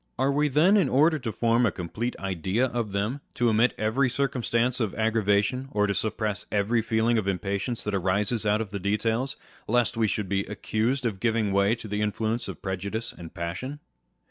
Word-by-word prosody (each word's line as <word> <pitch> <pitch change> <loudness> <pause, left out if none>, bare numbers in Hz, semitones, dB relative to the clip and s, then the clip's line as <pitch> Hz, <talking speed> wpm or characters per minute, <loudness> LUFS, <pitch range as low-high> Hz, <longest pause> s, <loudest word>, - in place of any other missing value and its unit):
Are 135 +2 +2
we 150 +2 +2
then, 160 +9 +4
in 175 -10 +3
order 155 +4 +4
to 120 -4 -3
form 115 +3 +2
a 115 - +3
complete 105 +9 -4
idea 95 +5 0
of 120 -4 -2
them, 105 +8 -2
to 120 -1 +2
omit 115 +3 +3
every 115 +5 +1
circumstance 125 -2 0
of 110 -5 -1
aggravation, 110 +3 +1
or 105 -5 +1
to 100 - 0
suppress 110 -1 -2
every 105 +3 +2
feeling 115 +1 +2
of 100 - -3
impatience 100 +5 -2
that 105 - -3
arises 100 +4 0
out 105 +1 +2
of 105 -4 -5
the 100 - -3
details, 110 +6 0 0.3
lest 120 0 +1
we 110 -1 +3
should 105 -1 -2
be 100 +1 0
accused 115 +5 -1
of 105 -5 -1
giving 110 -2 +1
way 100 +3 +3
to 115 - -9
the 105 0 -2
influence 110 +2 -1
of - - -8
prejudice 100 +4 -3
and 85 -1 -10
passion 95 - -4
110 Hz, 195 wpm, -26 LUFS, 100-120 Hz, 0.3 s, then